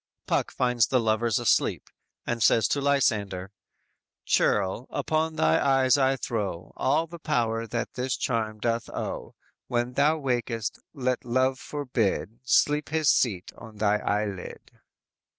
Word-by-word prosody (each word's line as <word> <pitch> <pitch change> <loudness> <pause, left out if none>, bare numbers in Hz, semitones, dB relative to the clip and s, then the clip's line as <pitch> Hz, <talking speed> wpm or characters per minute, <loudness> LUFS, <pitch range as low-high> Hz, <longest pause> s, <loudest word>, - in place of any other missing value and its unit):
"_ - - -63
Puck - - 0
finds 125 -3 +2
the 130 - +2
lovers 115 -1 +1
asleep, - - +1 0.4
and 120 -1 -2
says 110 -2 +4
to 140 - 0
Lysander: 105 -9 0 0.7
_"Churl, 100 +5 +1
upon 160 0 -1
thy 80 - +3
eyes 135 -2 +4
I 135 -1 +3
throw, 100 -9 -4
All 150 +5 +1
the 170 +1 -11
power 115 -7 -1
that 115 +2 -3
this 130 +1 -2
charm 110 -3 -1
doth 115 +1 -1
owe, - - -5 0.3
When 120 +1 -1
thou 150 +4 +3
wakest, 120 -5 -2 0.2
let 130 -2 -1
love 130 +2 +1
forbid 120 -6 -2
Sleep 150 +3 +2
his 155 -2 +3
seat 95 -8 0
on 110 -2 -12
thy 105 0 +2
eyelid." 100 -3 -3
120 Hz, 140 wpm, -26 LUFS, 110-135 Hz, 0.7 s, says